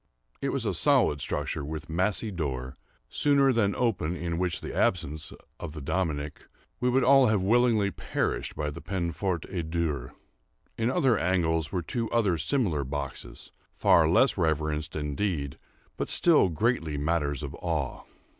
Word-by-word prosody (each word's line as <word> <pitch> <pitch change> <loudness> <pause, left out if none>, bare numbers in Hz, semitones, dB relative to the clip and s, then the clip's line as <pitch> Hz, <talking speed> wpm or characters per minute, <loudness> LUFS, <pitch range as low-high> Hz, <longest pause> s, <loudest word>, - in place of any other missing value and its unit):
It - - 0
was - - -2
a - - 0
solid 70 -1 +3
structure, - - -3
with 80 +2 -6
massy 95 +6 0
door, 65 -7 -4 0.3
sooner 140 -2 +3
than 100 -4 +1
open 85 -7 -1
which 90 -2 -1
in - - -5
the - - -6
absence 80 -3 0 0.3
of 80 -3 -6
the 80 - -7
"Dominie," 75 -1 -1 0.5
we 125 - +1
would 130 +1 +3
all 135 0 +6
have 105 -3 +2
willingly 110 -1 +3
perished - - -2
by 75 0 -2
the - - -9
peine 90 -3 -2
forte 90 -1 -2
et 85 -4 -3
dure. 75 -6 -2 0.6
In 115 +1 0
other 130 -5 +2
angles 80 -3 +1
were 90 -2 -2
two 115 +6 -2
other 100 -8 +1
similar 95 - 0
boxes, 70 +1 -6 0.2
far 80 -2 +4
less 105 +5 +3
reverenced, 75 -2 -1
indeed, 75 -1 -2 0.4
but - - -3
still 160 - +4
greatly 80 -4 0
matters 75 -2 -1
of 70 -1 -5
awe. 80 -6 -2
85 Hz, 155 wpm, -28 LUFS, 75-105 Hz, 0.6 s, all